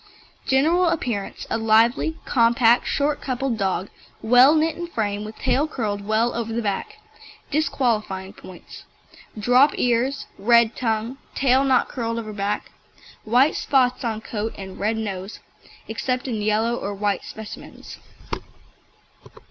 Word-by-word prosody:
GENERAL 330 Hz, +7 st, +3 dB
APPEARANCE 240 Hz, -11 st, -3 dB
A -, -, 0 dB
lively, 230 Hz, +8 st, +3 dB
compact, 235 Hz, -1 st, +3 dB
short 290 Hz, +1 st, 0 dB
coupled 255 Hz, -3 st, -2 dB
dog, 190 Hz, 0 st, -1 dB, 0.3 s
well 250 Hz, +6 st, +6 dB
knit 315 Hz, 0 st, +1 dB
in 345 Hz, 0 st, -5 dB
frame, 210 Hz, -9 st, -2 dB
with 215 Hz, +1 st, -9 dB
tail 290 Hz, +4 st, +1 dB
curled 205 Hz, -8 st, -4 dB
well 220 Hz, +2 st, +1 dB
over 230 Hz, -1 st, -3 dB
the 235 Hz, +1 st, -1 dB
back. 200 Hz, -2 st, -3 dB, 0.5 s
DISQUALIFYING 220 Hz, -10 st, -1 dB
POINTS 185 Hz, -2 st, -13 dB, 0.5 s
Drop 250 Hz, +7 st, +4 dB
ears, 250 Hz, +3 st, 0 dB
red 235 Hz, +2 st, +4 dB
tongue, 230 Hz, +2 st, -2 dB, 0.2 s
tail 265 Hz, 0 st, +3 dB
not 265 Hz, -2 st, +3 dB
curled 230 Hz, -2 st, -3 dB
over 215 Hz, -2 st, -5 dB
back, 200 Hz, 0 st, -3 dB, 0.5 s
white 250 Hz, +7 st, +4 dB
spots 255 Hz, -2 st, +1 dB
on 220 Hz, -2 st, -2 dB
coat, 220 Hz, 0 st, -4 dB
and 190 Hz, -1 st, -9 dB
red 215 Hz, +2 st, 0 dB
nose, 195 Hz, -2 st, -5 dB, 0.5 s
except 250 Hz, +3 st, -2 dB
in 225 Hz, -4 st, -2 dB
yellow 215 Hz, +3 st, +1 dB
or 200 Hz, 0 st, -4 dB
white 205 Hz, 0 st, -1 dB
specimens. 220 Hz, -1 st, -10 dB
230 Hz, 130 wpm, -23 LUFS, 215-260 Hz, 0.5 s, well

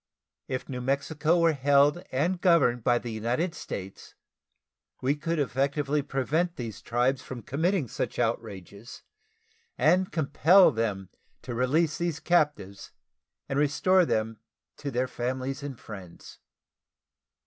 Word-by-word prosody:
If 130 Hz, -, -4 dB
New 125 Hz, -2 st, -5 dB
Mexico 150 Hz, +5 st, 0 dB
were 165 Hz, -1 st, +4 dB
held 145 Hz, +3 st, +3 dB
and 175 Hz, +7 st, 0 dB
governed 145 Hz, -, +3 dB
by 120 Hz, +1 st, +3 dB
the 120 Hz, -1 st, -5 dB
United 120 Hz, +11 st, -1 dB
States, 95 Hz, -, -8 dB, 0.8 s
we 130 Hz, +2 st, +1 dB
could 165 Hz, +3 st, -2 dB
effectually 140 Hz, +1 st, 0 dB
prevent 155 Hz, +6 st, -1 dB
these 115 Hz, -, -6 dB
tribes 125 Hz, +3 st, 0 dB
from 125 Hz, -3 st, -8 dB
committing 160 Hz, +1 st, 0 dB
such -, -, -4 dB
outrages, 110 Hz, -2 st, -4 dB, 0.7 s
and 180 Hz, +4 st, +3 dB
compel 160 Hz, +4 st, +5 dB
them 105 Hz, -6 st, -2 dB, 0.3 s
to 125 Hz, -, -5 dB
release 145 Hz, +6 st, +1 dB
these 170 Hz, -3 st, -2 dB
captives 145 Hz, -, 0 dB, 0.6 s
and 135 Hz, -, -1 dB
restore 180 Hz, +6 st, +3 dB
them 110 Hz, -7 st, -1 dB, 0.4 s
to 145 Hz, -, -5 dB
their 130 Hz, 0 st, -1 dB
families 130 Hz, +3 st, -3 dB
and 140 Hz, -4 st, -7 dB
friends. 95 Hz, -8 st, -11 dB
135 Hz, 125 wpm, -27 LUFS, 120-155 Hz, 0.8 s, compel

